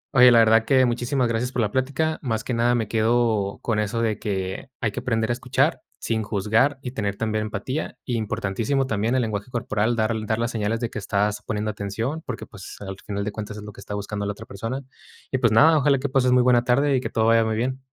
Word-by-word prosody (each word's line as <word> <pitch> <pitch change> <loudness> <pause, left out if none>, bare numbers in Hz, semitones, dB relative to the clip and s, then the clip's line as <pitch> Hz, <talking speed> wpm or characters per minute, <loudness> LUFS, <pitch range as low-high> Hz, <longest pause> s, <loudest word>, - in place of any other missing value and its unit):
oye, 125 0 +9
la 120 - +6
verdad 110 0 +5
que 130 +1 +4
muchísimas 125 +2 0
gracias 115 +2 -1
por 120 -3 0
la 105 - -1
plática. 140 +5 0
Más 115 -5 -2
que 125 - -3
nada 120 +1 +2
me 115 -3 -1
quedo 110 -3 +1
con 110 -3 0
eso 105 +2 -1
de 110 -3 0
que, 95 +3 -3
hay 110 - 0
que - - -4
aprender 115 -2 0
a - - +3
escuchar 120 - 0 0.2
sin 110 -1 -1
juzgar 110 +7 +1
y 125 - -4
tener 100 -5 -2
también 110 0 -1
empatía. 120 +5 -4
Importantísimo 115 +3 -1
también 110 +1 0
el 130 - +2
lenguaje 105 +1 -3
corporal, 120 -1 0
dar 110 0 +1
dar 110 +1 +1
las 115 +1 -1
señales 110 0 -1
de 120 - -2
que 110 - -4
estás 105 +1 0
poniendo 105 0 -2
atención, 110 +10 -3
porque, 125 - -5
pues, 95 -1 -10
al 95 -1 -6
final 100 -1 -3
de 105 - -3
cuentas, 105 0 -6
es 105 - -8
lo 105 - -8
que - - -12
está 105 - -6
buscando 100 0 -4
la 100 - -2
otra - - -11
persona. 115 +7 -5 0.5
Y 130 - 0
pues 115 -3 +3
nada, 155 +8 +6
ojalá 140 0 +3
que 140 +1 -3
pases 130 -2 +2
muy 125 0 +5
buena 120 -1 +4
tarde 135 +3 +2
y 130 - +1
que - - -4
todo 110 - +1
vaya 115 0 +5
muy 110 0 -1
bien. 130 +4 -2
115 Hz, 240 wpm, -24 LUFS, 105-125 Hz, 0.5 s, oye